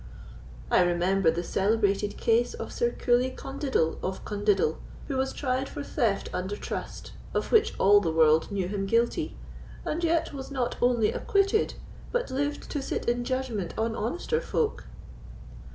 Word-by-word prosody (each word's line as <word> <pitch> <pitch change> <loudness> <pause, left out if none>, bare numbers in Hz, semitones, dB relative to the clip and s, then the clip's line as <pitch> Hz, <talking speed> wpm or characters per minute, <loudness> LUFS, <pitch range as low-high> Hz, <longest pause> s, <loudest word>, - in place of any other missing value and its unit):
I - - +5
remember 175 +1 +2
the 170 +2 -1
celebrated 205 +1 +1
case 235 +1 +2
of - - -6
Sir 475 - +1
Coolie 250 - +1
Condiddle 270 - -1
of 190 0 -4
Condiddle, 205 -6 +1 0.3
who 275 - -2
was 265 0 0
tried 260 -1 -1
for 285 - -6
theft 230 -8 0
under 185 +3 -2
trust, - - -6 0.2
of - - -1
which 445 -2 +4
all 205 +1 +7
the 170 - 0
world 160 +2 +4
knew 195 -3 -1
him 195 0 -2
guilty, 235 - +1 0.5
and 335 +3 -2
yet 330 -1 +1
was 270 -1 -6
not 255 -3 -1
only 240 -3 +3
acquitted, 400 +1 +1 0.4
but - - -1
lived 290 +2 -2
to 290 - -2
sit 270 - -3
in 240 0 +1
judgment 240 -8 -2
on 225 0 0
honester 355 - -1
folk." 460 -3 -1
235 Hz, 155 wpm, -27 LUFS, 195-280 Hz, 0.5 s, all